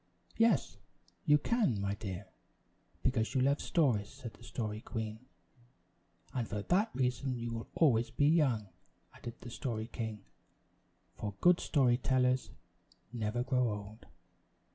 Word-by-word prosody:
"Yes, 225 -8 +2 0.5
you 150 - +7
can, 175 - +1
my 100 0 0
dear, 100 -4 -5 0.8
because 120 -2 +1
you 130 - +3
love 140 +2 +3
stories," 120 -11 +2
said 115 -1 -9
the - - -20
Story 110 -3 -4
Queen. 110 -2 -4 1.1
"And 120 -4 -1
for 105 -1 -3
that 200 - +2
reason 130 0 0
you 120 0 -4
will 115 0 -5
always 120 -8 +4
be 145 - +1
young," 135 - +3 0.4
added 120 -1 -8
the 120 - -8
Story 115 -4 -3
King; 110 -4 -5 0.9
"for 105 -2 -5
good 180 0 +6
story 125 -5 +3
tellers 130 0 +2 0.6
never 115 +1 -1
grow 125 -2 +2
old." 105 0 -7
120 Hz, 135 wpm, -33 LUFS, 110-135 Hz, 1.1 s, you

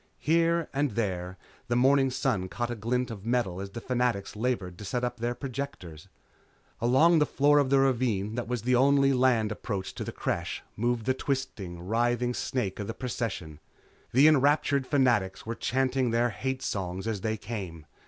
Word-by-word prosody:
Here 165 +1 +2
and 140 -3 0
there 95 -4 -2 0.3
the 120 - 0
morning 135 +2 +4
sun 125 -8 -1
caught 120 +4 -3
a - - -3
glint 125 +3 -1
of 100 -4 -8
metal 110 -6 -1
as 100 - -6
the 110 - -7
Fanatics 125 -6 -1
labored 105 -6 -2
to - - -7
set 120 +5 -2
up 125 0 -2
their 120 +1 -1
projectors. 120 - -6 0.7
Along 155 +8 +4
the 150 - +4
floor 145 +1 +4
of 140 -2 +2
the 135 - +4
ravine 120 -6 +1
that 120 -1 -3
was 120 -2 -3
the 125 +1 +1
only 140 +1 +4
land 125 -4 +2
approach 100 -3 -4
to - - -5
the - - -5
Creche - - -3
moved 120 0 -1
the 130 - +2
twisting, 130 -11 -4
writhing 120 +3 +1
snake 110 -7 -2
of 105 - -4
the 115 - -5
procession. 110 - -4 0.5
The 135 +5 +6
enraptured 140 -2 +3
Fanatics 120 -10 +1
were 115 - -3
chanting 130 +1 0
their 120 +1 +1
hate 130 +5 -3
songs 95 -1 -3
as 110 -4 -2
they 110 +1 -1
came. 95 -8 -6
120 Hz, 180 wpm, -28 LUFS, 105-130 Hz, 0.7 s, The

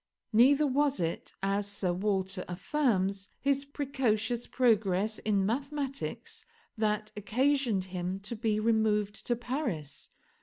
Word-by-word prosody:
Neither 275 +7 +6
was 285 +1 +2
it, 165 -1 -2
as 200 +1 0
Sir 190 -3 0
Walter 190 0 -1
affirms, 195 -2 0
his 280 0 +1
precocious 245 -5 -1
progress 215 -4 +2
in 200 -3 +1
mathematics 275 +4 -3 0.3
that 215 -1 0
occasioned 240 0 +1
him 185 0 -4
to 210 +4 -6
be 215 -1 0
removed 215 -2 +2
to 240 - +2
Paris. 235 - -4
215 Hz, 115 wpm, -30 LUFS, 195-265 Hz, 0.3 s, Neither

